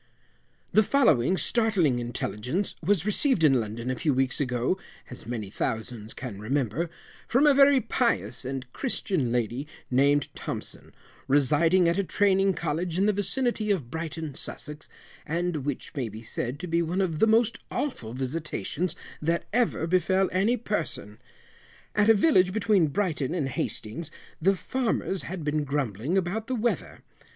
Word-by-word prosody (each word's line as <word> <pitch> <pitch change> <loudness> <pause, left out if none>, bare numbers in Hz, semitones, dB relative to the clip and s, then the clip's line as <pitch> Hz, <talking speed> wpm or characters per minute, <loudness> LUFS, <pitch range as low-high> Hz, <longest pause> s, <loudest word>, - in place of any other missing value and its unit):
The 215 - +6
following 190 - +3
startling 195 - +2
intelligence 120 - -3
was 190 0 +2
received 210 - +2
in 135 -4 +5
London 115 +3 -4
a - - -1
few 145 +2 0
weeks 130 0 0
ago 125 +7 0 0.3
(as 125 - -10
many 110 -5 -4
thousands 110 -1 -4
can 120 -7 -7
remember), 135 +7 -1 0.4
from 260 +5 +3
a 295 - +7
very 275 0 +6
pious 235 - 0
and 130 0 -4
Christian 185 - -1
lady 120 +4 -1 0.2
named 140 +2 +3
Thompson, - - -6 0.4
residing 155 +6 +4
at 170 +3 +1
a - - +2
Training 195 0 +2
College 170 +1 -2
in 195 - +3
the 210 - +3
vicinity 215 +2 0
of 155 -12 -1
Brighton, 160 -2 -4
Sussex, 150 +3 -2 0.3
and 170 +1 -1
which 145 -3 -4
may 130 -5 -3
be 110 +2 -9
said 120 +4 -2
to - - -4
be 170 0 +1
one 170 +3 -1
of 170 -5 0
the 220 - +5
most 225 +1 +3
awful 120 - -3
visitations 155 - -3 0.3
that 165 +2 0
ever 235 -8 +1
befel 185 +2 +2
any 205 +7 +2
person. 240 - 0 0.7
At 210 +1 +3
a 225 - +8
village 190 - +4
between 205 -5 +3
Brighton 160 -3 -1
and 150 -6 -1
Hastings, 130 +4 -3 0.3
the 195 +4 +4
farmers 225 -4 -2
had 175 -2 -6
been 150 0 0
grumbling 140 - -1
about 195 +5 -1
the 260 - -1
weather. 235 +1 -2
165 Hz, 155 wpm, -27 LUFS, 130-200 Hz, 0.7 s, a